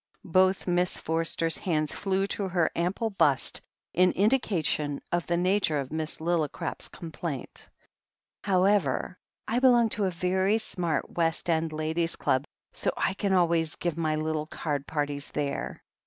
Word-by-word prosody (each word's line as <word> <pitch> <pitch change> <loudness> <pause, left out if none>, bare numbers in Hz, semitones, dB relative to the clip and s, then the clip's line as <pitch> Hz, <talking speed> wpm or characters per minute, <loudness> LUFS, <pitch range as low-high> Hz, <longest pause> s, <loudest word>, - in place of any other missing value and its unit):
Both 185 0 +4
Miss 180 0 +1
Forster's 165 0 -1
hands 155 -4 0
flew 195 -1 0
to 200 0 -2
her 175 -3 +1
ample 190 +6 -1
bust, 145 -8 +2 0.3
in 180 +1 +4
indication 185 - +1
of 175 -1 0
the 170 - +1
nature 180 -4 +2
of 135 -2 -5
Miss 155 0 -3
Lillicrap's 160 -2 -1
com 165 -2 -9
plaint. 155 -5 -6 0.7
"However, 185 -5 +2 0.3
I 235 - +1
belong 240 -3 +5
to 210 -1 +1
a - - +2
very 185 +4 +1
smart 180 -7 -2
West 165 0 0
End 160 0 0
Ladies' 160 +2 -1
Club, 130 +2 +1 0.3
so - - 0
I - - +1
can 200 0 -1
always 170 -3 +2
give 175 -3 -2
my 160 -2 0
little 155 0 -2
card 145 -3 -3
parties 145 -2 -2
there. 145 -1 -3
170 Hz, 150 wpm, -28 LUFS, 155-190 Hz, 0.7 s, belong